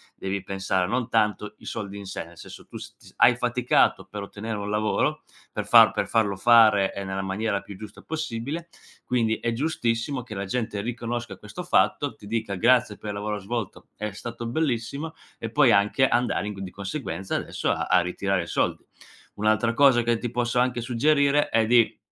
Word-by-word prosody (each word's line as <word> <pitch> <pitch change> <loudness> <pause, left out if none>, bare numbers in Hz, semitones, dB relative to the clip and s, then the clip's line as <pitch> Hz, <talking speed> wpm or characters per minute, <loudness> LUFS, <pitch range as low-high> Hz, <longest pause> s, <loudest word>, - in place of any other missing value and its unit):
devi 95 0 -4
pensare, 95 -1 -1
non 125 0 -1
tanto 105 -2 0
i - - -16
soldi 100 -1 -5
in 100 - -8
sé, 95 - -5
nel 85 0 -16
senso, - - -11
tu - - -9
st - - -10
s - - -16
hai - - +6
faticato - - +2
per 105 - -7
ottenere 105 +2 -5
un 100 0 -4
lavoro, 105 +1 0 0.3
per - - -4
far - - +7
per - - -2
farlo 105 -3 +1
fare, 110 -3 +5
ehm, 100 -1 -5
nella 95 0 -3
maniera 100 +1 -1
più 100 - -10
giusta 105 +2 -11
possibile, 155 +1 -4 0.3
quindi 115 -3 0
è 115 - -1
giustissimo 125 -1 -1
che 110 -4 -9
la 100 - -3
gente 110 0 -2
riconosca 120 -2 -4
questo 105 +12 -8
fatto, 145 -6 +1
ti 105 - -13
dica: 110 -2 -2
"Grazie 115 0 +3
per 105 - -7
il 105 - -4
lavoro 105 +1 -3
svolto, 105 +1 -5
è 105 0 -3
stato 115 +3 -7
bellissimo", 140 +4 -2 0.2
e 115 - -4
poi 130 +1 +4
anche 105 +6 +3
andare 120 -4 0
di 95 -2 -7
conseguenza 95 - -4
adesso - - -2
a - - -1
a 90 -1 +4
ritirare 90 +1 -1
i - - -10
sol - - 0 0.6
Un'altra 110 +2 +1
cosa 130 -3 +5
che 120 0 +1
ti 120 - -3
posso 120 +1 0
anche 125 -1 +1
suggerire 140 +4 +2
è 115 0 +2
di 120 0 +3
110 Hz, 190 wpm, -25 LUFS, 100-120 Hz, 0.6 s, far